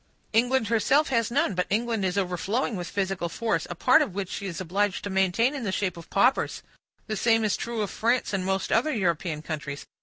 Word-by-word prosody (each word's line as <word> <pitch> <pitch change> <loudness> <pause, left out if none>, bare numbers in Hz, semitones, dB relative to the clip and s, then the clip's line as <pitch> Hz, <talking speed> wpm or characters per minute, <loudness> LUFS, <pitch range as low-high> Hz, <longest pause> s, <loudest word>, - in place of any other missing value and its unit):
England 240 0 +2
herself 235 +7 +3
has 230 -4 +1
none, 235 -4 +1
but 180 0 -1
England 225 0 0
is 185 +1 0
overflowing 200 +6 -1
with 175 -2 -5
physical 190 -3 -2
force, 165 -4 -1
a 175 - -5
part - - +5
of 190 - -2
which 195 -2 -3
she 200 - -4
is 175 - -5
obliged 190 +2 -1
to 205 - -4
maintain 190 +7 +2
in 275 -4 -5
the 200 - -1
shape 190 -1 -1
of 170 -1 -11
paupers. 250 +7 +2 0.4
The 215 - -3
same 225 +1 +3
is 210 - +1
true 235 -2 -3
of 200 - -4
France, 235 0 0
and 195 -1 0
most 190 0 -1
other 250 +8 +2
European 170 - -1
countries. 145 -3 -5
200 Hz, 215 wpm, -26 LUFS, 180-230 Hz, 0.4 s, part